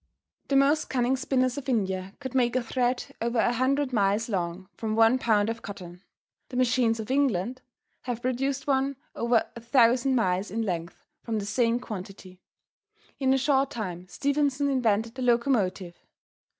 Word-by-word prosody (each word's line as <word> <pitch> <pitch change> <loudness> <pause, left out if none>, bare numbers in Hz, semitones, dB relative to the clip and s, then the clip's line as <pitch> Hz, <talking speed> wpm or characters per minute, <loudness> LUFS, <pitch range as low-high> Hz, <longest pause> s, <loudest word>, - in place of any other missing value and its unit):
The 275 - 0
most 280 +3 +3
cunning 250 0 +1
spinners 255 -1 0
of 270 - -7
India 190 -4 -1
could 260 -3 -6
make 245 -2 +2
a 255 - +1
thread 245 +1 0 0.2
over 235 +1 -1
100 255 +4 +1
miles 205 +1 +1
long 185 -2 -3
from 215 -1 -3
one 225 +3 +5
pound 215 -4 +2
of 230 0 -3
cotton. 180 -3 -9 0.5
The 250 - -5
machines 240 -2 +2
of 220 +3 -5
England 255 -3 0 0.4
have 240 -2 -4
produced 265 +2 -1
one 275 0 +1 0.2
over 235 -1 +2
1000 240 +2 +3
miles 190 -4 +1
in 225 +4 -2
length 170 -4 -4 0.2
from 225 -2 -3
the 205 - -3
same 230 +3 +1
quantity. 190 -4 -9 0.8
In 265 -2 +2
a 270 - +4
short 270 0 +2
time 185 -9 -5
Stephenson 280 +6 0
invented 225 -3 +1
the 260 - -7
locomotive. 235 -8 +1
235 Hz, 155 wpm, -27 LUFS, 205-260 Hz, 0.8 s, one